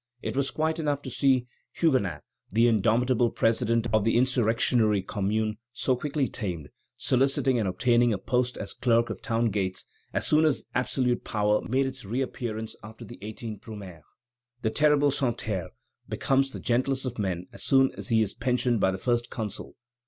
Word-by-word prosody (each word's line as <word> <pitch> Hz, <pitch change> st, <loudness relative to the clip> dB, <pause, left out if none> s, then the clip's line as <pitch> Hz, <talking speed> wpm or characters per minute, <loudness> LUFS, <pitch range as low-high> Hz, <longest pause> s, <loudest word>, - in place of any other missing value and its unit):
It -, -, -3 dB
was 140 Hz, 0 st, +1 dB
quite 160 Hz, +1 st, -1 dB
enough 145 Hz, -2 st, -1 dB
to -, -, -6 dB
see 130 Hz, -3 st, +2 dB, 0.3 s
Huguenin, 100 Hz, -, +1 dB, 0.3 s
the 115 Hz, +4 st, +4 dB
indomitable 120 Hz, +3 st, +3 dB
president 115 Hz, +1 st, +1 dB
of 110 Hz, -1 st, +4 dB
the 115 Hz, +2 st, +2 dB
insurrectionary 115 Hz, -4 st, +2 dB
Commune, 105 Hz, +2 st, -1 dB
so 130 Hz, +1 st, +1 dB
quickly 140 Hz, +1 st, -1 dB
tamed, 90 Hz, -, -5 dB, 0.3 s
soliciting 130 Hz, -1 st, +2 dB
and 105 Hz, -, 0 dB
obtaining 120 Hz, +5 st, +3 dB
a 105 Hz, -, 0 dB
post 125 Hz, +4 st, -1 dB
as -, -, -5 dB
clerk 115 Hz, -1 st, +2 dB
of -, -, -7 dB
town 115 Hz, -3 st, 0 dB
gates 95 Hz, -2 st, -2 dB, 0.3 s
as -, -, -2 dB
soon 155 Hz, +1 st, +4 dB
as 155 Hz, -3 st, +1 dB
absolute 125 Hz, 0 st, 0 dB
power 105 Hz, -1 st, +1 dB
made 135 Hz, +3 st, +2 dB
its 130 Hz, 0 st, -5 dB
reappearance 110 Hz, -1 st, -3 dB
after 110 Hz, +1 st, -10 dB
the 120 Hz, -, -11 dB
18th 110 Hz, 0 st, -7 dB
Brumaire. 100 Hz, -7 st, -9 dB, 0.6 s
The 110 Hz, -, +1 dB
terrible 145 Hz, 0 st, +4 dB
Santerre 115 Hz, -, -2 dB, 0.4 s
becomes 135 Hz, 0 st, +1 dB
the -, -, -7 dB
gentlest 130 Hz, +3 st, 0 dB
of 125 Hz, -2 st, -4 dB
men 90 Hz, -3 st, -2 dB
as -, -, -10 dB
soon 135 Hz, -1 st, +4 dB
as -, -, -7 dB
he 110 Hz, -2 st, +3 dB
is 100 Hz, -, -3 dB
pensioned 125 Hz, -1 st, 0 dB
by 95 Hz, -, +3 dB
the 95 Hz, -, -2 dB
First 120 Hz, +3 st, 0 dB
Consul. 110 Hz, -4 st, -5 dB
120 Hz, 170 wpm, -27 LUFS, 105-130 Hz, 0.6 s, the